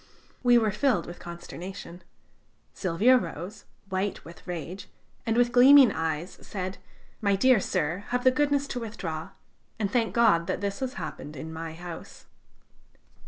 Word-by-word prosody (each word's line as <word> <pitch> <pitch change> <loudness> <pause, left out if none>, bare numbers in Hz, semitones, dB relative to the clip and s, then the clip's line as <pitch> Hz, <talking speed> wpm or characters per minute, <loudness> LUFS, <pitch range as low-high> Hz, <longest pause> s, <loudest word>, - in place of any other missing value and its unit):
We 245 -1 +6
were 220 -3 +2
filled 210 -3 +1
with 175 - -9
consternation. 175 +1 -8 0.7
Silvio 205 +8 +4
rose, 180 +1 -6 0.2
white 190 +1 -2
with 170 +2 -13
rage, 180 +2 -6 0.4
and 225 0 +1
with 240 0 +4
gleaming 260 +1 +8
eyes, 160 +2 -3
said: 190 -1 -5 0.4
"My 200 -2 +3
dear 255 +3 +5
sir, 170 +1 -1
have 245 0 -1
the 255 - +6
goodness 285 +1 +1
to 250 - -3
withdraw, 170 -9 -5 0.5
and 205 -3 -1
thank 230 -3 0
God 210 -8 +4
that - - -1
this 200 +2 -3
has 260 -1 -3
happened 150 - -6
in 160 +4 -7
my 160 0 -6
house." 170 0 -9
195 Hz, 150 wpm, -27 LUFS, 170-240 Hz, 0.7 s, gleaming